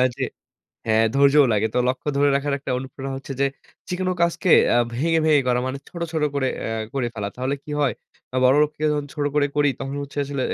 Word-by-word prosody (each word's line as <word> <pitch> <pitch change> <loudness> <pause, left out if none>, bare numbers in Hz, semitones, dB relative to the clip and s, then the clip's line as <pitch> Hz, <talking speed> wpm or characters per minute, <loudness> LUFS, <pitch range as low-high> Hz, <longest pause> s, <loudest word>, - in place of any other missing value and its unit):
যে - - -3 0.6
হ্যাঁ, 110 0 +4
ধৈর্যও 140 +1 +6
লাগে। 105 +1 +2
তো - - 0
লক্ষ্য 130 +3 -4
ধরে 145 0 +4
রাখার 140 +1 0
একটা 135 - -4
অনুপ্রেরণা 135 +1 -6
হচ্ছে 135 0 -7
যে - - +4 0.4
যেকোন 185 0 -1
কাজকে 170 +2 +1 0.3
আ - - +5 0.2
ভেঙে, 165 +7 +1
ভেঙে 150 -3 +5
করা 125 0 +2
মানে 130 +1 -3
ছোট, 170 - -8
ছোট 160 -2 -1
করে 135 -2 +1 0.2
এ - - -2 0.3
করে 130 -3 -1
ফেলা। 105 -2 -4
তাহলে 130 +3 -1
কি 150 - -8
হয়? 140 - +2 0.5
বড় 130 +1 +6
লোককে 150 0 -4
যখন 145 -1 -1
ছোট 145 -2 -2
করে 145 -1 +3
করি 145 0 +3
তখন 135 +1 -4
হচ্ছে 140 +1 -11
আসলে 140 -1 -4
140 Hz, 210 wpm, -23 LUFS, 130-150 Hz, 0.6 s, ধৈর্যও